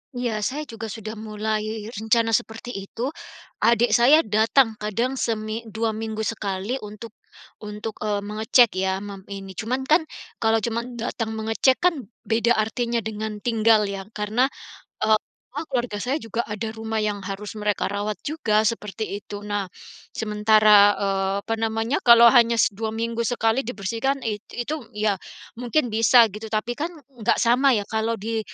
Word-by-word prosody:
Iya 240 -3 -1
saya 280 +8 -2
juga 225 -5 -7
sudah 215 0 -7
mulai 215 0 -3
rencana 225 +1 +1
seperti 225 +2 -2
itu. 230 +7 -4 0.5
Adik 235 0 +3
saya 255 +8 +6
datang 220 +2 +2
kadang 235 +5 -1
semi 220 0 -2
dua 220 +1 -1
minggu 220 0 -4
sekali 210 +3 -3
untuk 210 +1 -9 0.5
untuk, 210 +1 -6
eee, 210 -1 0
mengecek 220 +3 +3
ya, 190 0 0
mem 200 -2 -8
ini. 195 -1 -7
Cuman 250 +6 -2
kan, 315 +4 +4 0.4
kalau 225 0 +3
cuma 235 0 -1
datang 225 -1 -3
mengecek 225 +4 +2
kan, 310 - +1 0.2
beda 230 +1 +2
artinya 235 +2 0
dengan 215 0 -4
tinggal 225 -2 +4
ya? 195 0 -5
Karena, 215 +5 +1 0.6
e - - +1 0.4
apa, 290 +4 -5
keluarga 240 -6 -2
saya 255 +6 -1
juga 235 -5 -3
ada 220 +1 -4
rumah 220 -1 -3
yang 210 -1 -1
harus 210 +2 -6
mereka 210 -1 0
rawat 205 +1 -2
juga 220 -9 +1
seperti 210 -1 -3
itu. 205 0 -9
Nah, 205 -2 -2 0.5
sementara, 210 -1 +5
eee, 195 -1 0
apa 225 - -1
namanya, 225 +3 0
kalau 235 -1 +8
hanya 235 -2 +5 0.2
dua 220 +3 -4
minggu 230 +1 -3
sekali 225 0 +1
dibersihkan, 240 +3 -2
it 210 -2 -2 0.2
itu 295 +6 -3 0.2
ya 210 -3 0 0.4
mungkin 245 0 0
bisa 230 +2 +6
gitu, 215 +3 -7
tapi 215 +2 -1
kan, 320 - 0 0.2
nggak 240 -4 -1
sama 250 +2 +4
ya 205 - 0
kalau 220 +2 -1
di 225 +2 -3
220 Hz, 155 wpm, -23 LUFS, 210-235 Hz, 0.6 s, kalau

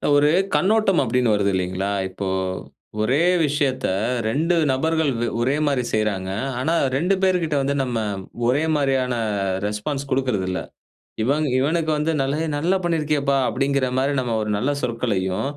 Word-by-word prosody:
ஒரு 145 +1 +4 0.2
கண்ணோட்டம் 200 -1 +3
அப்டின்னு 125 -3 +1
வருது 100 -1 +1
இல்லைங்ளா? 95 +1 -1 0.2
இப்போ 95 +1 -5 0.7
ஒரே 130 +7 +2 0.3
விஷயத்த 135 -3 0 0.4
2 160 +9 +1 0.2
நபர்கள் 160 +2 +1
வே 120 - 0
ஒரே 130 +4 +1
மாரி 140 -4 +1
செய்றாங்க. 100 -3 -1 0.3
ஆனா 160 +6 0 0.2
2 180 +7 +2
பேர்கிட்ட 175 -5 +1
வந்து 140 +1 0
நம்ம 120 -3 -2 0.5
ஒரே 140 +5 +2
மாரியான 135 -3 +1 0.5
ரெஸ்பான்ஸ் 135 +7 -3
குடுக்றதுல்ல. 105 -9 0 0.6
இவங் 145 +4 +1
இவனுக்கு 160 +3 +1
வந்து 155 +2 0
நல 135 +3 -1 0.2
நல்லா 180 +6 +1
பண்ணியிருக்கேப்பா 150 -4 +1
அப்டிங்குற 135 0 0
மாரி 140 +2 +1
நம்ம 120 -3 -1
ஒரு 105 0 -2
நல்ல 135 +7 0
சொற்களையும், 110 -2 -1
135 Hz, 135 wpm, -22 LUFS, 115-150 Hz, 0.7 s, ஒரு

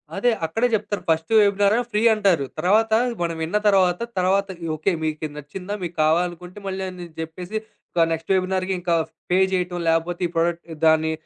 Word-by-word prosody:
అదే! 240 +5 +2
అక్కడే 225 +10 +1
జెప్తారు 210 -1 -1
ఫస్ట్ 160 +2 +1
వెబినారేమో 205 +3 +3
ఫ్రీ 210 0 +1
అంటారు. 195 -9 +2
తర్వాత 215 +6 +3 0.3
మనం 170 -1 -1
విన్న 170 +6 0
తర్వాత, 185 -3 +4 0.2
తర్వాత 195 +2 +2 0.3
"ఓకే. 155 +6 0
మీకిది 155 -1 -3
నచ్చిందా? 180 +7 -7
మీకు 175 -1 -5
కావాలనుకుంటే" 175 +4 0
మళ్ళీ 190 0 -3
అని 180 -1 -8
జెప్పేసి 175 +6 -5 0.4
ఒక 165 -1 +5
నెక్స్ట్ 165 +3 -3
వెబినార్‌కి 185 0 0
ఇంకా 175 -1 0 0.4
పే 180 - +4
జేయటం, 180 -1 -1
లేపోతే 165 +2 0
ఈ - - -13
ప్రొడక్ట్ 170 +1 0 0.2
దాన్ని 160 0 +4
180 Hz, 160 wpm, -23 LUFS, 165-195 Hz, 0.4 s, ఒక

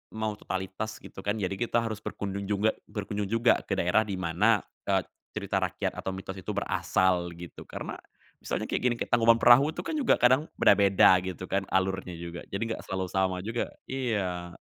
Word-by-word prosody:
mau 110 -1 -1
totalitas 95 +3 -4
gitu - - -11
kan, 100 +2 -1
jadi 100 -4 -2
kita 120 -1 +1
harus 110 -2 -3
berkunjung 100 -1 -5
juga 105 +2 +2 0.2
berkunjung 105 -1 -3
juga 115 +3 +3
ke - - -3
daerah 90 +5 +2
di 100 - -2
mana, 95 +4 +2 0.2
eee, - - +2 0.3
cerita - - -1
rakyat - - -1
atau 95 - -3
mitos 95 0 -7
itu 100 - -5
berasal 90 -2 +1
gitu. 85 0 -10
Karena - - -6 0.4
misalnya - - -3
kayak - - 0
gini, 125 -1 +2
kayak - - -5
Tangkuban 115 -1 +6
Perahu 140 +6 +7
itu 175 - -4
kan, 315 - -3
juga 260 - +4
kadang 130 +5 +4
beda-beda 95 -2 +6
gitu 95 -1 -5
kan 95 -1 0
alurnya 95 -1 0
juga. 85 0 -7
Jadi 115 +4 -3
gak - - -10
selalu 95 -1 -2
sama 95 -1 +1
juga 115 +3 -2 0.2
iya. 95 -9 -2
100 Hz, 185 wpm, -28 LUFS, 95-115 Hz, 0.4 s, Perahu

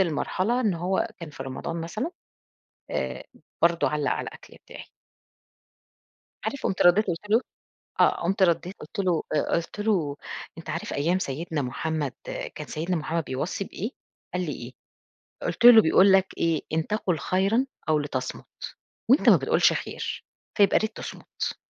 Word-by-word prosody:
لمرحلة 190 +7 +1
إن 215 -7 +2
هو 180 +6 0
كان 170 -3 -8
في 135 - -7
رمضان 135 +5 -4
مثلًا، 215 - -3 0.8
آآ - - -3 0.4
برضه 170 0 +4
علّق 150 -1 0
على - - -2
الأكل - - -14
بتاعي. - - -10 1.6
عارف، 280 - -3
قُمت 190 - 0
ردّيت 180 +5 +6
قُلت 180 +4 -4
له 230 - +5 0.6
آه. - - +4
قُمت 190 +2 +2
ردّيت 170 +2 +1
قُلت 155 - -8
له 180 -4 +1
آآ 150 - 0
قُلت 170 +5 -3
له: 180 -10 +1 0.4
"أنت - - -9
عارف - - -3
أيام 170 +6 +1
سيدنا 155 0 -3
محمد 150 +2 -2 0.4
كان - - -7
سيدنا 170 +4 -2
محمد 160 +1 -2
بيوصي 145 +9 -3
بإيه؟" 210 +4 -5 0.4
قال 180 0 -1
لي: 150 - -3
"إيه؟" 120 -1 -7 0.7
قُلت 235 - 0
له: 230 -2 +11
"بيقول 190 +5 +5
لك 190 0 +5
إيه، 165 -2 +1
إن 160 0 0
تقُل 200 -5 0
خيرًا 195 - +2 0.2
أو 155 -1 +4
لتصمُت، 135 -3 -4 0.6
وأنت 270 - +6
ما - - +9
بتقولش - - +3
خير، - - -4 0.3
فيبقى 200 -1 +5
ياريت 220 0 -2
تصمُت. - - -5
170 Hz, 155 wpm, -26 LUFS, 155-195 Hz, 1.6 s, له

